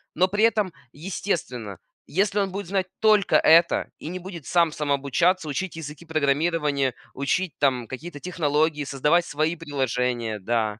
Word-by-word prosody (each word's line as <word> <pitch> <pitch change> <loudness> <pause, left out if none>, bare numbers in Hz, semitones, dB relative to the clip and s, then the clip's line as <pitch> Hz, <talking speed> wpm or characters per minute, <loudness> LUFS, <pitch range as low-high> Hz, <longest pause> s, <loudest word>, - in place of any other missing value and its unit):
Но 185 +3 +4
при 205 +3 0
этом, 210 -5 +1 0.2
естественно, 145 - -4 0.3
если 200 +3 +1
он 195 -2 0
будет 200 -2 -5
знать 190 -1 -1
только 215 -3 +4
это 165 +1 +4
и - - -8
не 185 +1 -5
будет 175 -5 -9
сам 170 -3 +3
самообучаться, 150 +5 +1
учить 180 +3 -3
языки 150 +1 -8
программирования, 150 -3 +1 0.2
учить 155 +6 -1
там 130 -5 +1
какие-то 145 +3 -8
технологии, 150 -3 0
создавать 150 +6 +2
свои 155 +2 -1
приложения, 125 -7 -2
да. 110 0 -1
155 Hz, 145 wpm, -24 LUFS, 140-180 Hz, 0.3 s, Но